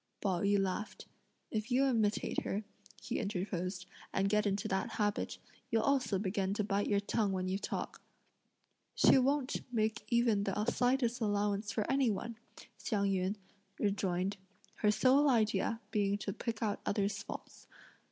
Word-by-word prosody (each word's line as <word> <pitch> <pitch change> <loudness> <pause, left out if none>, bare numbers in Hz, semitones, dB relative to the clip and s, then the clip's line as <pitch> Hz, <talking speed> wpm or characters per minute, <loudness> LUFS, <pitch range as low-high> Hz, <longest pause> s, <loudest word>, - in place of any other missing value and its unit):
Pao 185 -4 0
yü 200 0 +3
laughed. 195 +2 -3 0.5
"If 215 +1 -2
you 260 +2 +3
imitate 220 -5 +1
her," 205 +2 -2 0.4
he - - -3
interposed, 185 -3 -3 0.3
"and 195 0 +1
get 210 0 +2
into 200 0 -1
that 190 0 -1
habit, 205 -1 -1 0.3
you'll 225 -1 +2
also 270 -8 +2
begin 195 0 -1
to 210 - 0
bite 200 0 0
your 205 - +3
tongue 205 0 0
when 185 -1 -1
you 190 +1 -1
talk." - - -4 0.9
"She - - +6
won't 275 +1 +1
make 215 -2 0
even 235 -4 +3
the 205 +2 -1
slightest 245 0 +1
allowance 205 -1 0
for 215 - -1
any 270 -3 +3
one," 220 +3 -3 0.4
Hsiang 200 -4 0
yün 190 +1 0 0.4
rejoined; 195 -1 0 0.4
"her 210 - +3
sole 265 +6 +4
idea 220 -2 +2
being 205 -2 +1
to 200 -1 -4
pick 230 +1 -3
out 205 -2 -1
others' 200 0 0
faults. - - -9
210 Hz, 150 wpm, -34 LUFS, 195-230 Hz, 0.9 s, She